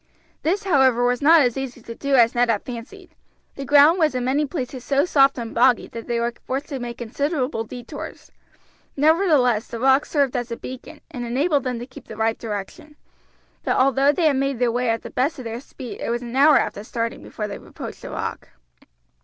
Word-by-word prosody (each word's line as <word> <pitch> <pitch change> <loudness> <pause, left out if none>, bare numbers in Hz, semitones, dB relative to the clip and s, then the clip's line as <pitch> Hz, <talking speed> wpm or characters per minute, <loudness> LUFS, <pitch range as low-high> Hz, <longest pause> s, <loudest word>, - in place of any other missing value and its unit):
This, 385 +7 0
however, 265 -9 +3
was 245 0 +1
not 320 +2 +7
as 245 -4 +2
easy 265 -2 -5
to 230 - -7
do 280 +3 0
as 235 -2 +5
Ned 245 0 +2
had 215 -3 +1
fancied; 260 - -9 0.4
the 275 - -7
ground 295 +5 +6
was 310 -5 +2
in 250 -1 -1
many 285 +3 +1
places 260 -4 -5
so 280 +3 +2
soft 275 -5 +4
and 230 -2 -5
boggy 245 +1 +4
that 230 -1 -8
they 235 -1 -1
were 235 0 -1
forced 270 +3 -3
to 275 - -4
make 240 -1 -6
considerable 255 0 -2
detours. 245 +2 -9 0.7
Nevertheless 290 - +3
the 230 - -6
rocks 265 +3 +3
served 280 -4 +1
as 245 -1 -2
a 235 - -4
beacon, 255 -1 -9
and 250 -5 -5
enabled 280 +5 0
them 250 -2 -2
to 240 - -6
keep 265 +1 -14
the 220 - -9
right 225 0 0
direction; 220 +7 -7 0.7
but - - 0
although 270 +2 +4
they 310 -1 +2
made 275 -1 0
their 240 0 +1
way 245 +1 0
at 225 0 -1
the - - -8
best 275 +5 0
of 255 - -8
their 230 +1 -5
speed 255 -3 -9
it - - -3
was 240 +1 -2
an 240 +1 -7
hour 290 +3 +6
after 205 - -2
starting 230 0 -4
before 210 - -6
they 200 - -6
approached - - -9
the - - -8
rock. - - -5
255 Hz, 210 wpm, -22 LUFS, 235-285 Hz, 0.7 s, not